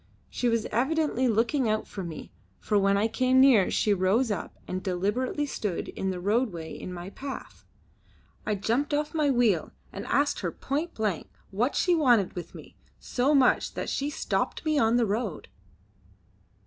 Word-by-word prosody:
She 245 - 0
was 230 -1 0
evidently 265 +2 +1
looking 235 +3 +1
out 215 0 0
for 195 - -7
me, 165 -3 -8 0.3
for 210 -2 +1
when 195 0 +3
I 210 +2 +2
came 255 +3 +2
near 255 -8 +6
she 210 - +2
rose 200 +6 +2
up 205 - -4
and 185 0 -3
deliberately 210 +10 -1
stood 210 -10 -3
in 190 - -3
the 185 -1 -3
roadway 200 -4 -1
in 185 - -7
my 180 +2 -7
path. 275 +4 -8 0.8
I 210 - -1
jumped 240 +9 0
off 300 +1 -2
my 305 -3 +2
wheel 235 - +2 0.2
and - - -6
asked - - +1
her - - -2
point 300 +5 -3
blank 210 -7 -2 0.2
what 235 +8 0
she 360 - +2
wanted 245 - +3
with 175 - -8
me - - -12 0.2
so 270 +4 +1
much 265 -3 +3
that - - -3
she 280 +1 -1
stopped 320 +1 -2
me 310 -2 +2
on 225 -1 +3
the 240 - +3
road. 215 +4 -3
230 Hz, 175 wpm, -27 LUFS, 195-270 Hz, 0.8 s, near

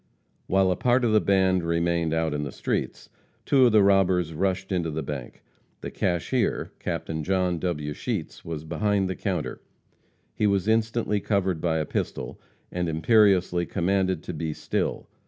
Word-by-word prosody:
While 95 0 +3
a - - +1
part 125 +4 +2
of 115 - +2
the 110 - +4
band 95 -2 +3
remained 85 0 0
out 80 -1 0
in 75 - -2
the 70 - -4
streets, - - -3 0.4
two 130 -3 +5
of - - +3
the 105 -2 +5
robbers 95 -4 +3
rushed 95 +3 -1
into 85 -3 0
the 80 0 -3
bank. 70 -4 -7 0.4
The - - -6
cashier, 85 -2 -1
Captain 80 -1 -3
John 90 -1 0
W. 75 -5 -2
Sheets, - - -4
was 80 -2 -5
behind 95 +5 0
the 95 - -3
counter. 90 -7 -3 0.7
He 105 - +1
was 100 -1 +1
instantly 110 -1 +1
covered 95 -5 0
by 80 -2 +1
a 80 - -1
pistol, - - -4 0.3
and 90 -1 -2
imperiously 90 0 +3
commanded 95 -2 0
to - - -5
be 80 0 -3
still. - - -2
90 Hz, 165 wpm, -26 LUFS, 80-100 Hz, 0.7 s, two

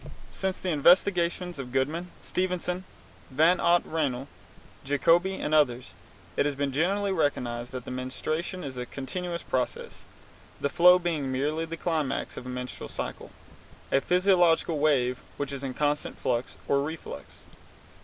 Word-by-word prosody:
Since 190 -1 -2
the 185 - -3
investigations 175 +1 +3
of 125 -2 -6
Goodman, 150 +7 -1
Stephenson, 180 0 -2 0.4
Van 160 +7 +4
Ott, 175 0 +4
Reinl, 140 -5 -1 0.6
Jacobi, 170 +7 +3
and 150 - -3
others, 130 -5 +2 0.4
it - - +2
has 145 - -2
been 140 0 -1
generally 195 +8 +1
recognized 125 -8 -1
that 125 -2 -5
menstruation 155 +8 -3
is 135 -3 -6
a 125 0 -4
continuous 170 +7 -4
process, 125 -1 -3 0.5
the 140 - 0
flow 180 +3 +7
being 160 -7 -1
merely 150 +5 0
the 165 0 -6
climax 160 -5 -1
of 125 - -7
a - - -5
menstrual 125 0 -6
cycle, - - -5 0.6
a 135 - +4
physiological 175 -3 +3
wave 125 -4 +2 0.2
which 145 -1 -3
is 135 0 -5
in 130 -2 -4
constant 150 0 0
flux 120 +1 -1
or 140 0 +3
reflux. 145 - -7
150 Hz, 145 wpm, -28 LUFS, 130-175 Hz, 0.6 s, flow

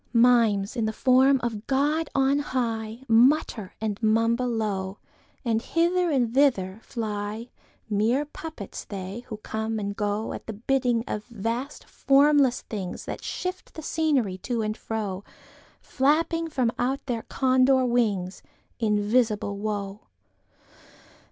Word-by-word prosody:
Mimes, 230 -4 +4
in 230 -3 0
the 220 - -1
form 260 +3 +4
of 225 -2 -3
God 290 +4 +1
on 275 +1 +3
high, 230 -4 -3
Mutter 235 -3 +3
and 215 -1 -3
mumble 230 +3 +2
low, 205 -4 -2 0.5
And 225 -1 +1
hither 345 +5 +1
and 245 -6 +1
thither 225 -8 +2
fly—Mere 220 +2 -3
puppets 300 -7 -8
they, 195 +1 -6
who 215 - -6
come 220 +1 -3
and 200 -1 -3
goAt 210 +1 -3
bidding 250 -4 +2
of 210 - -4
vast 235 +4 -4
formless 275 -2 +3
thingsThat 190 -5 -5
shift 365 0 -5
the 315 - -7
scenery 275 -13 0
to 235 +2 -2
and 215 0 -2
fro, 205 -4 -4 0.6
Flapping 325 +4 +1
from 255 -6 +1
out 260 +3 -1
their 240 -4 -2
Condor 260 +1 +3
wingsInvisible 210 0 0
Woe! 205 -1 -3
230 Hz, 115 wpm, -26 LUFS, 210-265 Hz, 0.6 s, Mimes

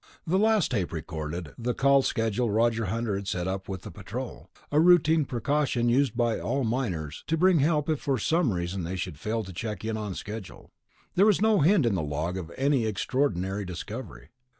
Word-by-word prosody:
The 185 +3 +2
last 215 -5 +3
tape 100 -8 -1
recorded 80 0 -5
the 120 +1 -1
call 140 0 +4
schedule 115 -1 0
Roger 115 +1 +2
Hunter 115 +2 -1
had 100 0 -4
set 90 -1 -2
up 95 +1 -4
with 95 -2 -5
the - - -8
Patrol, - - -7 0.2
a 145 - +3
routine 160 -2 +5
precaution 125 -1 0
used 130 0 +2
by 120 -2 +1
all 135 0 -1
miners, 100 - -2
to 165 - +1
bring 180 0 +4
help 150 0 +2
if 155 -3 0
for 135 -2 0
some 155 +3 +1
reason 90 0 -3
they 90 +3 -3
should 90 -5 -5
fail 110 +4 -2
to 95 -1 -9
check 105 +2 -5
in 110 0 -2
on 105 -3 -4
schedule. 105 -1 -8 0.4
There 195 +4 +5
was 210 - +4
no 220 0 +4
hint 165 0 +4
in 115 - +2
the 90 - 0
log 75 +4 -2
of 85 -3 -6
any 135 -4 +2
extraordinary 100 -3 -1
discovery. 100 +7 -7
115 Hz, 195 wpm, -27 LUFS, 95-140 Hz, 0.4 s, routine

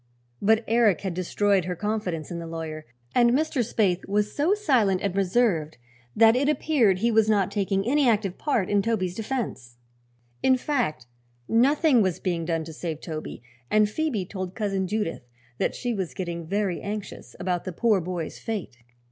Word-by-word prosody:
But 220 +2 +3
Eric 225 -6 +3
had 190 -3 -3
destroyed 190 +1 +1
her 180 0 -3
confidence 190 -6 -3
in 170 - -4
the 165 - -6
lawyer, 160 -1 -6 0.3
and 240 -1 +5
Mr. 305 0 0
Spaythe 200 -5 0
was 210 +1 0
so 325 +8 +2
silent 245 - +2
and 195 -2 -2
reserved 185 -6 +1 0.4
that 225 +1 +6
it 280 +3 +2
appeared 270 - +2
he 230 +5 +1
was 220 -1 +3
not 200 -3 +2
taking 195 -1 0
any 275 +1 +3
active 205 -4 +1
part 240 -11 0
in 205 -1 +2
Toby's 195 -5 -1
defense. 210 - -4 0.6
In 260 -1 +4
fact, 245 - -1 0.4
nothing 265 +2 +4
was 185 -4 0
being 170 -3 -2
done 165 -1 -1
to 160 0 -9
save 160 -1 -5
Toby, 155 -7 -7 0.3
and 215 0 +4
Phoebe 230 -4 -2
told 185 -1 -6
Cousin 195 -3 -1
Judith 210 -4 -2 0.4
that - - 0
she 245 -1 -2
was 190 -5 -4
getting 170 -3 -4
very 195 -1 -1
anxious 205 0 -6
about 180 -1 -1
the 185 - -3
poor 210 +2 +2
boy's 175 -1 -5
fate. 200 - -5
200 Hz, 175 wpm, -25 LUFS, 180-230 Hz, 0.6 s, that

